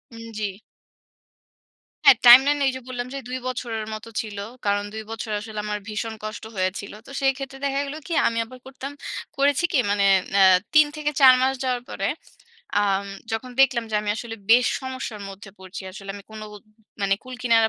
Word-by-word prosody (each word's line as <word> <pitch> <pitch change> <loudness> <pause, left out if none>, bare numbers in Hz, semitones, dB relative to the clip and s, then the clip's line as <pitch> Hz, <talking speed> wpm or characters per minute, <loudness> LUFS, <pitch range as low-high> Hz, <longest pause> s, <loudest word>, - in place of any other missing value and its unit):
উম 230 - -9
জী। 210 -1 -1 1.6
হ্যাঁ, 275 -4 +9
timeline 270 +4 +8
এইযে 260 -1 -1
বললাম 245 -1 -4
যে - - -4
২ 255 - -2
বছরের 235 -3 -3
মত 215 0 -7 0.2
ছিলো। 205 -2 -6 0.2
কারণ 205 0 +1
২ 220 0 -5
বছর 225 0 -5
আসলে 215 0 -6
আমার 210 0 -2
ভীষণ 220 +1 -3
কষ্ট 215 0 -6
হয়েছিলো। 190 +2 -2
তো - - -12
সেই 270 -1 +3
ক্ষেত্রে 270 -1 -7
দেখা 275 0 0
গেলো 280 +2 -6
কি 345 - -3
আমি 230 - -1
আবার 255 +2 -13
করতাম 265 +1 -7 0.5
করেছি 285 +3 +3
কি - - +4
মানে 205 -1 +2 0.3
ন্যা 200 - +4 0.3
৩ 305 0 +8
থেকে 300 -1 -1
৪ 260 -1 +10
মাস 265 +1 +3
যাওয়ার 250 -2 0
পরে - - -2 0.7
আম 200 -1 +1 0.3
যখন 225 +3 -3
দেখলাম 255 -3 +4
যে - - -3
আমি 210 0 -2
আসলে 225 -1 -6
বেশ 245 +2 +7
সমস্যার 260 -5 -5
মধ্যে 195 +1 -10
পড়ছি 190 +1 -9
আসলে 195 0 -8
আমি 200 - -9
কোনো 215 0 -8
ও - - -8 0.5
মানে 195 0 +3
কুল-কিনারা 240 -3 +2
230 Hz, 185 wpm, -24 LUFS, 210-260 Hz, 1.6 s, ৪